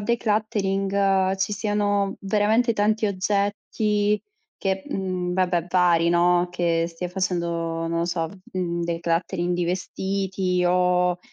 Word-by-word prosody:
decluttering 200 -3 +1
ci 195 +2 -1
siano 205 -1 0
veramente 215 +4 +2
tanti 215 +1 +1
oggetti 205 +1 0 0.4
che 190 0 -1
uhm, 185 -2 -2
vabbè, 180 -2 +1
pari, 175 -2 +3
no, 175 +1 +3
che 170 -1 0
stia 170 +1 -5
facendo, 180 -2 -1 0.4
non 165 0 -1
lo 170 - +1
so, 170 -2 -1 0.3
uhm, 175 -2 -2
decluttering 170 +1 -1
di 175 0 0
vestiti 190 0 -1
o 180 0 +2
185 Hz, 115 wpm, -24 LUFS, 175-205 Hz, 0.4 s, pari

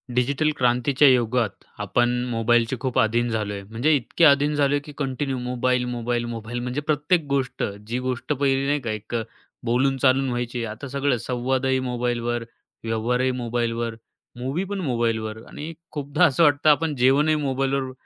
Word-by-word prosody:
Digital 140 +5 +2
क्रांतीच्या 125 +3 +3
युगात 120 -3 +2 0.2
आपण 120 +4 +1 0.2
मोबाईलचे 115 +1 +2
खूप 130 -1 -2
आधीन 120 +2 +2
झालोय. 105 -3 -2
म्हणजे 115 +9 0
इतके 140 +5 +2
आधीन 145 0 +5
झालोय, 145 0 +2
की 145 +1 -11
कंटिन्यू 135 -1 -2
मोबाईल 125 0 0
मोबाईल 120 -1 -2
मोबाईल. 115 0 -5
म्हणजे 125 +4 -3
प्रत्येक 150 +3 +1
गोष्ट 135 -2 -1 0.2
जी 120 +2 -2
गोष्ट 130 +3 -1
पहिली 135 -1 +1
नाही 145 +1 +1
का, 115 -4 -3
एक 110 +2 -5
अ, 115 - +1 0.4
बोलून 130 +3 +2
चालून 135 0 +3
व्हायची 120 -1 -3
आता 110 +6 -7
सगळं 140 -1 0
संवादही 130 +2 0
मोबाईलवर, 120 -1 -2 0.4
व्यवहारही 120 +3 0
मोबाईलवर, 115 -1 -2 0.4
मूव्ही 135 +9 -2
पण 200 +1 -4
मोबाईलवर 115 -5 -1
आणि 155 +3 -7 0.2
खूपदा 145 +3 +1
असं 160 +1 +3
वाटतं 145 0 +4
आपण 150 +1 +3
जेवणही 140 +5 +3
मोबाईलवर 135 -2 -1
125 Hz, 155 wpm, -24 LUFS, 120-140 Hz, 0.4 s, आधीन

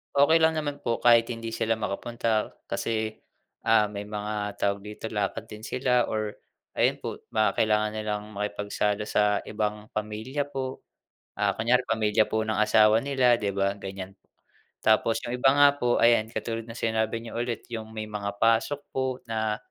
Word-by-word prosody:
okey 160 +4 +5
lang 160 0 +4
naman 145 -1 -4
po 115 -1 0
kahit 115 -1 +5
hindi 115 -1 -5
sila 115 0 +1
makapunta 110 +1 -1 0.2
kasi, 110 -1 -2 0.5
ah, 110 -2 +5
may 100 0 -5
mga 105 -1 -4
tawag 100 0 0
dito, 105 +1 -7
lakad 105 -2 -2
din 105 0 -10
sila 125 0 +1
or 110 -1 -2 0.4
ayun - - +2
po - - -6
baka 110 0 +2
kailangan 105 0 +2
nilang 105 -1 -3
makipagsalo 105 0 -1
sa 105 0 +2
ibang 105 0 -3
pamilya 110 +7 -2
po. 130 -1 -4 0.6
Ah, 100 -1 +2
kunyari, 125 +3 +2
pamilya 110 -1 +2
po 110 0 0
ng 110 -1 -2
asawa 110 0 +5
nila 130 -3 +3
'di 100 -1 -1
ba 100 0 +1
ganiyan. 95 -1 -7 0.7
Tapos 110 +1 +3
yung 120 - -2
iba 135 +2 +5
nga 145 0 +6
po, 120 0 +2
ayan 115 -2 +4
katulad 115 -1 -4
ng 115 - -8
sinabi 110 0 0
niyo 115 - -7
ulit 120 -1 -3
yung 110 -1 -5
may 110 - -3
mga 100 -1 -4
pasok 115 +5 +2
po 130 -1 -1
na, 110 -1 -1
110 Hz, 165 wpm, -27 LUFS, 105-120 Hz, 0.7 s, nga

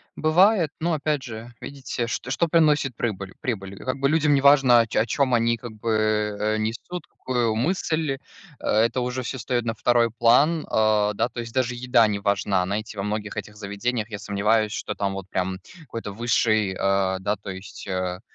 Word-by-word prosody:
Бывает, 175 +1 +4
но, 170 +1 0
опять 150 -1 0
же, 115 +1 -8
видите, 135 -3 -4
что 120 +3 -4
что 170 - +1
приносит 150 -5 +3
прыбыль 100 -5 -3
прибыль? 100 -8 -4
Как 130 +5 -3
бы 140 - +2
людям 155 -1 +3
неважно, 135 -3 +6
о 115 - +2
чё - - 0
о 115 - +1
чём 130 +3 +1
они, 115 0 +2
как 120 +1 -8
бы, 110 +1 -3 0.5
э, 110 +1 0
несут 115 +11 -4
какую 120 -3 -1
мысль, 155 0 0 0.4
это 115 +3 +1
уже 125 +1 -2
всё 130 +2 -5
встаёт 120 -1 -1
на 115 - -1
2 120 +1 +3
план, 150 +7 +4
а, 105 -1 +3
да, 120 +4 0
то 120 - -8
есть 115 0 -9
даже 125 -2 0
еда 120 -2 +3
не 105 -1 -2
важна, 100 -1 +1
знаете, 105 +2 -4
во 100 - -2
многих 105 0 -4
этих 105 +1 -5
заведениях, 105 +2 -3
я 105 - -5
сомневаюсь, 105 +1 +1
что - - -4
там 100 -1 -1
вот 95 -1 -6
прям 95 0 -2 0.2
какой-то 115 -7 -7
высший, 110 -3 +1
а, 95 -1 +1
да, 100 +2 -1
то 100 0 -10
есть, 95 +1 -10
а, 90 -1 -2
115 Hz, 190 wpm, -24 LUFS, 105-130 Hz, 0.5 s, неважно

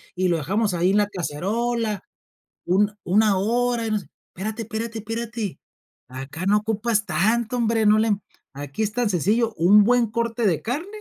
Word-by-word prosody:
y 185 0 +1
lo 170 -2 +2
dejamos 200 +7 0
ahí 175 +1 +2
en 200 - +2
la 205 -1 +3
cacerola 210 +5 -2 0.6
un 205 +4 +2
una 205 +2 +3
hora, 235 +3 0
y - - -2
no 215 - +1
sé". 180 - -14 0.3
Espérate, 215 +4 -4
espérate, 225 +1 -5
espérate. 225 -2 -4 0.5
Acá 135 +7 -7
no 205 +2 +4
ocupas 220 0 0
tanto, 220 +7 +1
hombre, 225 -2 +1
no 210 +1 +6
le 220 0 +2 0.4
aquí 145 +8 -4
es 210 - -1
tan 240 0 0
sencillo, 210 +6 +1
un 200 +5 +6
buen 240 +2 +3
corte 235 0 -1
de 165 -5 +1
carne 285 - -3
215 Hz, 175 wpm, -23 LUFS, 190-230 Hz, 0.6 s, no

